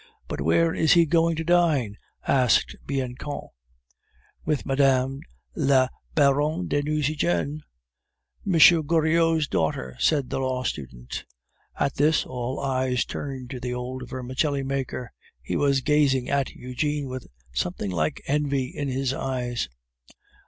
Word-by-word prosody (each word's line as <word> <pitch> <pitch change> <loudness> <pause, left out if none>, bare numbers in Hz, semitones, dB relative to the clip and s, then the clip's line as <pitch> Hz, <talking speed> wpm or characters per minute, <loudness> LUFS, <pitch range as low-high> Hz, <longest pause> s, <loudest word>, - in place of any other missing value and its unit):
"But - - -4
where 160 - +3
is 160 - +4
he 170 -1 +6
going 165 +1 +2
to 160 - -3
dine?" 160 -11 +2 0.3
asked 125 -3 +3
Bianchon. 135 +1 -4 0.9
"With 150 -3 -1
Madame 135 -1 +2 0.4
la 130 -2 +3 0.3
Baronne 150 +4 +2
de 145 - +1
Nucingen." 145 - 0 0.8
"M. 200 - -2 0.3
Goriot's 160 0 +2
daughter," 65 - -1
said 125 - +2
the - - -1
law 130 -1 -1
student. 60 - -5 0.6
At 140 -1 0
this, 150 +2 +3
all 125 +1 -4
eyes 130 -2 0
turned 130 -3 -6
to 130 - -5
the 125 0 -3
old 125 0 -5
vermicelli 130 +3 -1
maker; 135 -3 -3 0.3
he - - -4
was 140 -2 +2
gazing 140 -3 +2
at 140 -1 +1
Eugene 145 +3 -3
with 130 -1 -6 0.3
something 90 +9 -2
like 80 -3 -1
envy 140 -2 0
in 145 - -2
his 135 0 -1
eyes. 125 - -2
135 Hz, 130 wpm, -25 LUFS, 125-150 Hz, 0.9 s, he